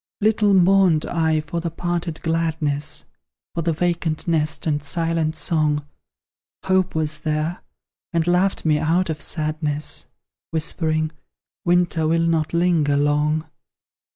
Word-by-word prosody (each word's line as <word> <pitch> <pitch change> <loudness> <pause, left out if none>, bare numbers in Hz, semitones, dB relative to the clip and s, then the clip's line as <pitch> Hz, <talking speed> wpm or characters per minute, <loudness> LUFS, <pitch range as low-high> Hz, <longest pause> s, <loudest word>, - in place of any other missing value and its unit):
Little 210 -1 +3
mourned 185 -3 +4
I 160 -2 +1
for 155 +3 -4
the 170 0 -2
parted 170 0 -3
gladness, 160 -3 -1 0.5
For 170 - -2
the 165 +1 0
vacant 165 -1 -1
nest 155 -2 +1
and 150 -2 0
silent 165 +1 0
song 155 -3 +1 0.8
Hope 190 -2 +1
was 155 -1 0
there, 155 +3 -2 0.5
and 165 -1 +1
laughed 180 +2 +1
me 155 -1 +3
out 170 +2 +1
of 155 - -5
sadness; 155 -1 -2 0.4
Whispering, 155 -1 0 0.5
"Winter 175 -2 +2
will 165 +1 +2
not 165 -2 +1
linger 170 -4 +2
long!" 150 +2 +1
160 Hz, 125 wpm, -22 LUFS, 155-175 Hz, 0.8 s, mourned